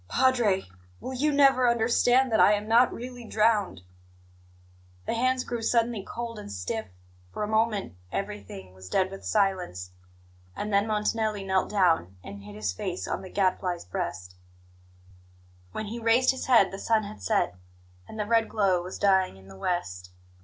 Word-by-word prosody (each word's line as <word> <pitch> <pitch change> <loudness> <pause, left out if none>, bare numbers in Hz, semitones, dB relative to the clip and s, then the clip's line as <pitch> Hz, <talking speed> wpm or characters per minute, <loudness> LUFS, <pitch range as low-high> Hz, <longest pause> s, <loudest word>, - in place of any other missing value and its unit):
"Padre, 240 -7 +2 0.3
will 260 - -6
you 295 +4 +1
never 270 -3 +5
understand 245 +2 +3
that 220 - +2
I 210 - +6
am 210 +1 -2
not 235 +3 +5
really 245 0 -8
drowned?" 215 - +1 1.2
The - - -1
hands 255 +2 +1
grew 240 -1 -4
suddenly 230 -1 +1
cold 230 0 -6
and 100 - -9
stiff. 100 +3 -4 0.4
For 210 - -4
a - - -1
moment 220 - 0 0.2
everything 195 - -6
was 95 0 -12
dead 190 - +1
with 195 - -9
silence, 180 - -1 0.6
and 210 0 -4
then 200 +2 +3
Montanelli 215 -1 -1
knelt 190 -1 0
down 165 - +1
and 100 0 -9
hid 100 +1 -11
his 105 -3 -2
face 180 - -4
on - - -3
the 185 - -9
Gadfly's 185 -2 -1
breast. 90 0 -5 1.4
When 215 - -4
he 225 +3 -6
raised 230 +3 +4
his 260 - -6
head 230 -7 +5
the 195 - -7
sun 220 0 +1
had 210 +1 -9
set, 205 - +1 0.5
and 220 - -9
the 210 - 0
red 225 +1 +2
glow 195 -4 +2
was 180 +2 -7
dying 190 - +2
in 95 0 -17
the 95 - -12
west. 95 - -3
210 Hz, 165 wpm, -27 LUFS, 180-230 Hz, 1.4 s, I